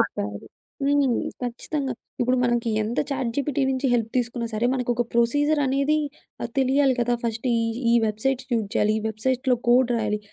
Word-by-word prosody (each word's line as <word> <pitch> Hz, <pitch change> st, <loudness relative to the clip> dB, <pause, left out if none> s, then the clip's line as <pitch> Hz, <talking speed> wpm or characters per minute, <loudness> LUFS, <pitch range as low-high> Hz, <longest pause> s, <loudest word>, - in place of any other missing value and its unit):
చెప్పారు. 100 Hz, 0 st, -2 dB, 0.4 s
హ్మ్. 280 Hz, -3 st, +3 dB, 0.3 s
ఖచ్చితంగా 260 Hz, +3 st, -3 dB, 0.3 s
ఇప్పుడు 250 Hz, +1 st, +2 dB
మనకి 240 Hz, -1 st, +1 dB
ఎంత 225 Hz, +3 st, -3 dB
చాట్‌జీపిటీ 275 Hz, +2 st, -1 dB
నుంచి 265 Hz, +1 st, 0 dB
హెల్ప్ 230 Hz, -2 st, +1 dB
తీసుకున్నా 235 Hz, -1 st, -1 dB
సరే 225 Hz, +3 st, +1 dB
మనకొక 245 Hz, -1 st, 0 dB
ప్రొసీజర్ 290 Hz, +6 st, +2 dB
అనేది 280 Hz, +3 st, +2 dB, 0.4 s
ఆహ్, 235 Hz, -, -3 dB
తెలియాలి 270 Hz, 0 st, +3 dB
కదా! 240 Hz, 0 st, +2 dB
ఫస్ట్ 225 Hz, +2 st, -2 dB
ఈ, -, -, +2 dB, 0.3 s
ఈ -, -, +5 dB
వెబ్‌సైట్ 245 Hz, +5 st, -1 dB
యూజ్ 225 Hz, -3 st, +1 dB
చేయాలి. 210 Hz, -, +3 dB
ఈ -, -, -4 dB
వెబ్‌సైట్‌లో 250 Hz, +4 st, 0 dB
కోడ్ 245 Hz, +1 st, +5 dB
రాయాలి. 210 Hz, -2 st, 0 dB
245 Hz, 155 wpm, -24 LUFS, 230-270 Hz, 0.4 s, ఈ